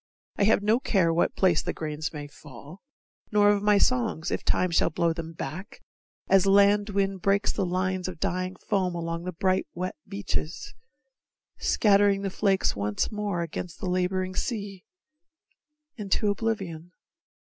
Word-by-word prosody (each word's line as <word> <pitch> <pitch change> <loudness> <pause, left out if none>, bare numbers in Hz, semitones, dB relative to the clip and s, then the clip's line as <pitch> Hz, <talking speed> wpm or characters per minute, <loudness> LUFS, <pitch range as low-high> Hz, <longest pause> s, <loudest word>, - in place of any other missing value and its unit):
I 200 - +2
have 210 -1 +3
no 220 +3 +3
care 185 -10 +2
what 170 - +1
place 180 -5 +3
the - - -3
grains 155 -1 -4
may 150 -2 -6
fall, 145 - -13 0.5
Nor 205 -1 +5
of 205 -1 +1
my 210 0 +4
songs, 225 -8 +1
if - - -2
Time 185 -1 +1
shall 165 - +3
blow 165 +1 0
them 165 0 -7
back, 185 +6 -7 0.5
As 195 0 +4
land 200 +1 +4
wind 195 -2 -1
breaks 200 +2 +2
the 190 - -1
lines 185 +1 -1
of 175 -3 -7
dying 185 +2 -2
foam 185 -3 -1
Along 165 0 -4
the 185 - -3
bright 185 +1 0
wet 185 +1 -3
beaches, 200 - -4 0.9
scattering 200 -1 +3
The 195 - -2
flakes 195 -1 +1
once 100 0 -1
more 205 -5 -2
against 170 +1 -6
the - - -5
laboring 185 +1 -1
sea, 200 -4 -4 1.1
Into 205 0 0
oblivion. 190 -6 -3
185 Hz, 155 wpm, -27 LUFS, 170-200 Hz, 1.1 s, Nor